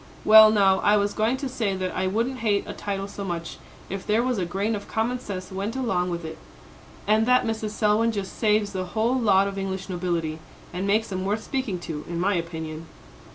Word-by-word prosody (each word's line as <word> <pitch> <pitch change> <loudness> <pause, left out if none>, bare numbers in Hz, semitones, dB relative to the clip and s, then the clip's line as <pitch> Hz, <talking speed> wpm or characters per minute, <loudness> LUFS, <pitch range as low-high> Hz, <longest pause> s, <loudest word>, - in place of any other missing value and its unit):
Well, 215 0 +9
now, 195 -3 +4
I 210 +1 +4
was 205 0 0
going 225 +4 +1
to 275 +1 -4
say 220 -6 -1
that 185 -1 -3
I 185 0 0
wouldn't 230 +7 -1
hate 210 -3 +1
a - - -6
title 195 -1 -4
so 200 0 -7
much, 170 -3 -5 0.3
if 195 0 -5
there 220 +3 +1
was 250 -4 0
a 180 - 0
grain 200 +5 -1
of 205 -1 -5
common 235 +3 -1
sense 185 -5 -7
went 200 +5 -3
along 190 -9 0
with 170 -1 -4
it. 160 - -7 0.7
And 215 +2 +3
that 250 0 +4
Mrs. 220 -1 -2
Selwyn 215 +2 +2
just 200 -3 -5
saves 210 -2 +2
the 185 -1 -2
whole 230 +3 +2
lot 200 -6 +3
of 195 0 -4
English 195 0 -4
nobility, 170 -3 -2 0.3
and 185 +3 -2
makes 215 +2 +1
'em 185 0 -2
worth 210 +3 -1
speaking 260 -8 -2
to, 155 -3 -5
in 170 0 -4
my 195 +3 +2
opinion." 160 -2 -4
200 Hz, 215 wpm, -25 LUFS, 185-220 Hz, 0.7 s, Well